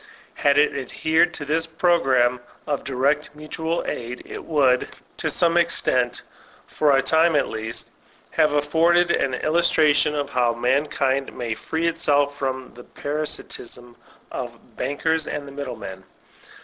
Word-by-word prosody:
Had 145 -1 +2
it 145 -1 +3
adhered 160 +5 +1
to 145 - -5
this 160 +3 0
program 135 -8 +2 0.3
of 145 -2 -2
direct 140 +3 0
mutual 160 +2 -3
aid, 120 +1 -5
it - - -8
would, 135 -5 +2 0.3
to - - 0
some 170 0 +3
extent, 130 -7 +2 0.4
for 145 -3 +2
a 135 - +2
time 160 +3 +4
at 145 - +2
least, 110 +1 -5 0.4
have 155 - +3
afforded 165 +4 +3
an 130 -5 +1
illustration 155 -1 +3
of 145 -1 -3
how 120 -3 +1
mankind 135 +2 0
may 120 -2 -2
free 160 +8 -3
itself 145 -4 +1
from 130 -2 -4
the 120 - -12
parasitism 125 -5 -5 0.4
of - - -5
the - - -20 0.2
bankers 155 +4 -1
and 145 -1 -4
the - - -9
middlemen. 120 -9 -7
145 Hz, 140 wpm, -23 LUFS, 130-160 Hz, 0.4 s, time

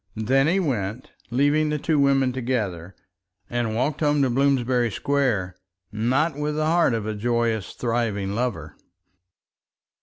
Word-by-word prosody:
Then 130 +6 +2
he 185 +4 +2
went, 120 - -3 0.2
leaving 145 +5 +2
the 150 - 0
two 150 +1 0
women 135 -2 +3
together, 105 -9 -3 0.6
and 120 -2 -1
walked 135 +5 -1
home 145 -2 +2
to 130 - +1
Bloomsbury 130 -2 +2
Square, 105 -7 -1 0.3
not 130 +9 0
with 150 +1 -2
the 155 0 0
heart 165 -6 +3
of 110 -2 -3
a 110 - -2
joyous 115 -1 -1
thriving 115 -5 -2
lover. 105 -10 -3
125 Hz, 140 wpm, -24 LUFS, 110-140 Hz, 0.6 s, women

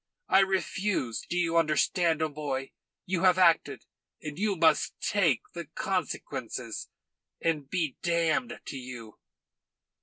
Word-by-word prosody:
I 190 - +6
refuse 190 - 0
do 175 - -1
you 170 -1 +2
understand? 165 +1 +2
O'Moy, 145 -3 -3 0.3
you 180 -2 -1
have 185 -1 +5
acted; 170 -3 +3 0.3
and 150 +1 -7
you 205 -1 +1
must 165 -2 +2
take 175 - +2
the 170 -1 -5
consequences, 185 -5 -3 0.5
and 150 -4 -1
be 160 -7 -1
damned 170 +6 0
to - - -6
you." 125 -4 -9
165 Hz, 120 wpm, -29 LUFS, 150-185 Hz, 0.5 s, I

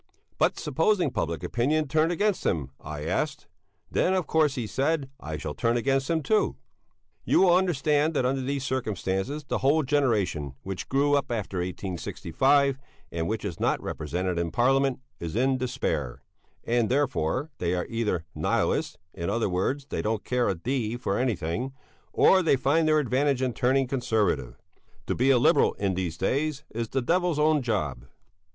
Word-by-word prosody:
"But - - +2
supposing 160 +2 +1
public 80 -7 -2
opinion 150 +6 0
turned 155 +4 +2
against 205 +3 0
him?" 70 -5 -1
I 75 0 -6
asked. 150 - -2 0.5
"Then, 190 - +2
of 185 -4 0
course," 155 -2 +2
he 120 - -2
said, 135 +4 -1
"I 80 0 -5
shall 75 0 -5
turn 115 +9 +1
against 135 +3 0
him 165 -2 +1
too." 215 +5 +2 0.7
You - - +3
will 180 -2 +6
understand 155 -3 +2
that 130 - +1
under 135 +1 0
these 135 +1 -2
circumstances 120 - -2
the - - -2
whole 150 +4 +3
generation 105 - 0
which 95 -1 -5
grew 140 +2 +2
up 140 - +1
after 105 -5 -3
1865, 105 - 0 0.3
and 80 -1 -2
which 110 -1 -3
is 90 -5 -5
not - - +1
represented 90 +3 -3
in 85 -1 -1
Parliament, 135 +7 +2 0.2
is 85 +1 -5
in 130 +2 +2
despair; 75 - -2 0.4
and 120 -2 +1
therefore 135 - 0
they 90 0 0
are 90 - -2
either 105 -8 -1
Nihilists - - 0 0.2
in 85 +1 -4
other 115 0 0
words, 115 +10 -1
they - - -3
don't 110 0 -1
care 125 -1 +1
a 95 - 0
d 120 +4 -2
for 100 -5 -1
anything 120 +1 -1 0.4
or 190 - +5
they 165 - +3
find 155 +5 +2
their 155 0 +4
advantage 135 -1 +1
in 125 -2 0
turning 130 +4 +2
Conservative. 110 - 0 0.5
To - - -1
be 130 +3 +2
a 135 - +6
Liberal - - +4
in 100 -2 -1
these 90 -3 -3
days 145 - -1
is 115 0 -3
the 135 -2 -1
devil's 175 +2 +1
own 150 0 +3
job. 75 - -2
125 Hz, 170 wpm, -27 LUFS, 95-145 Hz, 0.7 s, will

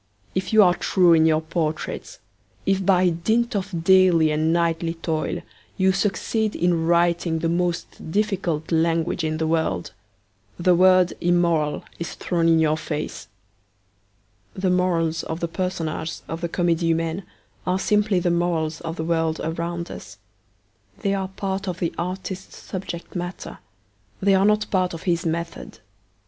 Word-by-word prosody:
If 185 -1 -2
you 220 -1 +7
are 180 -2 +5
true 175 -1 +3
in 160 0 +5
your 155 0 +3
portraits, 160 -1 -3 0.5
if, 195 0 +1
by 185 -1 +4
dint 220 +8 0
of 185 -4 -3
daily 180 -4 +5
and 155 +1 +1
nightly 165 0 0
toil, 160 -2 -2 0.4
you 190 0 +4
succeed 205 +3 0
in 170 -2 +1
writing 170 -1 +2
the 165 +1 -1
most 170 -1 -2
difficult 180 -6 -1
language 165 +1 +1
in 155 0 -1
the 160 - -1
world, 160 - -1 0.6
the 180 +1 +3
word 185 0 +5
immoral 170 -4 +1 0.2
is 170 - -5
thrown 170 -2 0
in 165 -1 +5
your 155 -1 +2
face.' 155 -1 -5 1.3
The 185 -1 0
morals 170 -3 +1
of 160 - -5
the 170 - -1
personages 165 -3 -3
of 165 +1 -5
the 170 - -2
Comedie 170 -1 +1
Humaine 165 +2 0 0.5
are 180 +1 +2
simply 210 -1 +2
the 175 0 +1
morals 170 -2 0
of 165 -1 -4
the 160 - -3
world 165 -1 0
around 170 +1 -3
us. - - -10 0.8
They 200 -2 +1
are 190 -1 -1
part 195 +1 -4
of 180 -2 -2
the 170 -2 -2
artist's 185 +2 -5
subject 180 -2 -7
matter; 175 +1 -5 0.6
they 195 0 +3
are 190 +1 +4
not 210 0 +2
part 185 -3 +1
of 165 - -9
his 170 -2 0
method. 170 +1 -4
170 Hz, 155 wpm, -23 LUFS, 165-185 Hz, 1.3 s, you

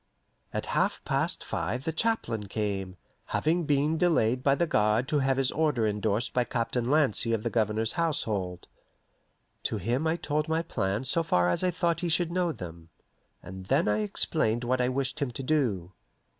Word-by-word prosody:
At - - -3
half - - 0
past - - 0
five 120 +10 -3
the 160 - -1
chaplain 160 - -1
came, 100 -3 -3 0.3
having 165 +2 0
been 150 +2 +1
delayed 125 -9 +2
by 140 0 +3
the 170 - +1
guard 110 -3 +2
to 150 - +2
have 135 -1 +1
his 135 -1 +2
order 150 -8 +1
indorsed 105 +2 0
by 125 - +2
Captain 120 0 -1
Lancy 135 -6 +3
of 110 -2 -1
the - - -1
Governor's 110 0 +1
household. 105 - -1 1.0
To 110 - -2
him 120 - -1
I 160 - +2
told 150 -2 -1
my 160 +1 +1
plans 105 -5 -2
so 165 - +2
far 90 - +2
as 90 - 0
I 185 - +3
thought 170 -1 0
he 175 - -1
should 170 +1 +1
know 175 -1 +1
them, 85 - -9 0.5
and 95 +1 -9
then - - +2
I 105 0 +2
explained 110 +2 +1
what 125 +1 +1
I 125 - +2
wished 130 0 -2
him 140 - 0
to 125 +3 -6
do. 120 - 0
125 Hz, 185 wpm, -28 LUFS, 105-155 Hz, 1.0 s, by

